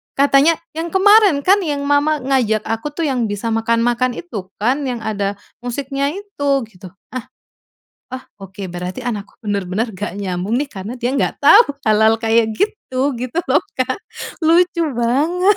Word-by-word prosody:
katanya, 280 +3 +4 0.2
"Yang 335 +3 -4
kemarin 410 -7 +5
kan, 390 +5 +5
yang 290 -4 -2
Mama 290 +1 +2
ngajak 235 -6 +1
aku 225 +6 -3
tuh 335 - -2
yang 250 -4 0
bisa 205 +3 -3
makan-makan 230 +2 +1
itu 210 - -7
kan, 260 +7 +1
yang 245 -2 -3
ada 205 -2 -2 0.3
musiknya 275 +3 -2
itu?" 395 -8 -4 0.2
Gitu. 185 -3 -13 0.2
Ah 255 -1 -6 0.9
ah, 260 0 -6 0.2
oke, 195 0 -7
berarti 180 +5 -5
anakku 210 -4 -5
bener-bener 200 +2 -1
nggak 200 0 -5
nyambung 190 +4 -2
nih, 295 - -1
karena 200 -1 -7
dia 245 +2 0
nggak - - -1
tau 400 +11 +8 0.3
hal-hal 220 +1 +4
kayak 225 0 +2
gitu 285 - -1
gitu 250 +6 -4
loh, - - +3 0.2
Kak, 260 +6 -1 0.4
lucu 340 +1 +3 0.2
banget, 335 - +2
255 Hz, 155 wpm, -18 LUFS, 220-290 Hz, 0.9 s, tau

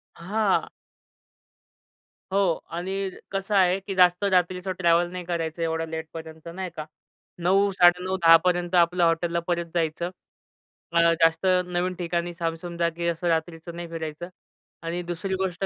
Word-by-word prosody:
हां. 200 +3 0 1.7
हो 195 - +2 0.4
आणि 190 +2 -2 0.2
कसं 195 +1 -2
आहे 185 0 +4
की 195 0 -6
जास्त 180 +1 +4
रात्रीचं 185 -1 +1
ट्रॅव्हल 175 0 +3
नाही 180 -1 -6
करायचं. 170 -1 -3
एवढं 165 0 -1
लेटपर्यंत 160 0 -8
नाही 185 0 -4
का, 155 - -5 0.5
9-9:30-10 180 -2 +4
पर्यंत 175 0 +1
आपलं 175 0 +4
हॉटेलला 170 +1 +1
परत 170 -1 0
जायचं. 170 +1 -1 1.1
जास्त 165 +2 +3 0.2
नवीन 180 +1 -1
ठिकाणी 175 0 -2
सामसूम 170 0 -4
जागी 170 0 -1
असं 170 +1 -1
रात्रीचं 165 0 -2
नाही 175 0 -6
फिरायचं. 165 +1 -6 0.5
आणि 170 +2 -3
दुसरी 175 +3 -3
गोष्ट 190 0 -2
175 Hz, 125 wpm, -25 LUFS, 165-185 Hz, 1.7 s, आहे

